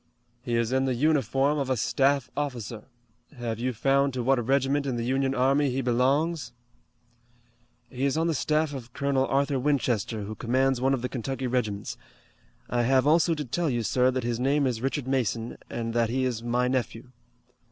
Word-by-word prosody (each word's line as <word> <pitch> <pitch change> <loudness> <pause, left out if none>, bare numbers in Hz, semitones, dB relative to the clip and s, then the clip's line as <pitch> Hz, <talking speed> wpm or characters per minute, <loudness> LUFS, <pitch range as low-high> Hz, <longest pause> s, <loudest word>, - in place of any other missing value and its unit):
"He 120 -1 -2
is 115 0 0
in 130 +1 +2
the 130 -2 0
uniform 140 +1 +2
of 135 -2 -2
a 130 - +1
staff 135 +3 +1
officer. 120 -6 -4 0.5
Have 115 -2 -4
you 130 +2 0
found 135 +3 +1
to 125 - -2
what 130 -1 +2
regiment 140 +3 +1
in 130 - -1
the 115 -1 -2
Union 135 +1 0
army 135 +3 +3
he 130 +1 -1
belongs?" 130 +3 +1 1.3
"He 130 0 -3
is 140 +2 +1
on 165 - +1
the 165 - +1
staff 155 +1 0
of 120 -3 -8
Colonel 140 -1 0
Arthur 140 0 +1
Winchester, 125 -6 0
who 105 +2 -5
commands 130 +3 +1
one 135 +1 +3
of 125 - -6
the 125 - -1
Kentucky 130 +1 -4
regiments. 110 -5 -2 0.7
I 120 - 0
have 130 +2 +3
also 165 +2 +4
to 150 -1 -4
tell 165 +6 -1
you, 120 -3 -1
sir, 125 +3 +2
that 130 -1 -2
his 120 0 -2
name 140 +3 +2
is 120 -4 -1
Richard 135 0 -2
Mason, 120 -3 -1
and 115 -1 -4
that 115 -1 +1
he 130 +2 0
is 120 -3 -2
my 120 +1 0
nephew." 125 -1 -3
130 Hz, 190 wpm, -27 LUFS, 120-140 Hz, 1.3 s, also